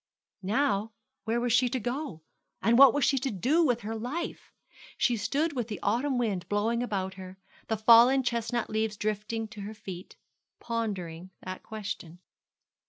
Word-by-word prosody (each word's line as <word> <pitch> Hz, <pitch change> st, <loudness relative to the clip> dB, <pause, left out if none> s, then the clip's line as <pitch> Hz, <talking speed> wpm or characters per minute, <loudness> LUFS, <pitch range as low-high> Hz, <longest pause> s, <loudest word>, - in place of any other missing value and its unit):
Now, 215 Hz, 0 st, 0 dB, 0.3 s
where 230 Hz, +2 st, 0 dB
was 240 Hz, -1 st, 0 dB
she 250 Hz, +1 st, +4 dB
to 260 Hz, +1 st, -1 dB
go? 245 Hz, -, -4 dB, 0.4 s
and 230 Hz, -, +3 dB
what 275 Hz, -2 st, +10 dB
was 290 Hz, -1 st, +1 dB
she 275 Hz, -3 st, +2 dB
to 265 Hz, -, -2 dB
do 260 Hz, -, +2 dB
with 245 Hz, -6 st, +1 dB
her 220 Hz, +1 st, -4 dB
life? 250 Hz, +10 st, -5 dB, 0.5 s
She 245 Hz, -, +2 dB
stood 280 Hz, +9 st, 0 dB
with 245 Hz, -5 st, -2 dB
the 210 Hz, -6 st, -5 dB
autumn 250 Hz, +6 st, +1 dB
wind 210 Hz, -7 st, -1 dB
blowing 220 Hz, +3 st, +1 dB
about 195 Hz, -5 st, -2 dB
her 185 Hz, 0 st, -10 dB, 0.3 s
the 220 Hz, -, 0 dB
fallen 235 Hz, +5 st, +7 dB
chestnut 235 Hz, 0 st, -1 dB
leaves 220 Hz, -1 st, -1 dB
drifting 215 Hz, +2 st, -2 dB
to 215 Hz, -2 st, -9 dB
her 210 Hz, +2 st, -7 dB
feet 185 Hz, -3 st, -9 dB, 0.4 s
pondering 190 Hz, -7 st, -4 dB
that 185 Hz, 0 st, -6 dB
question. 200 Hz, -6 st, -6 dB
225 Hz, 165 wpm, -29 LUFS, 205-245 Hz, 0.5 s, what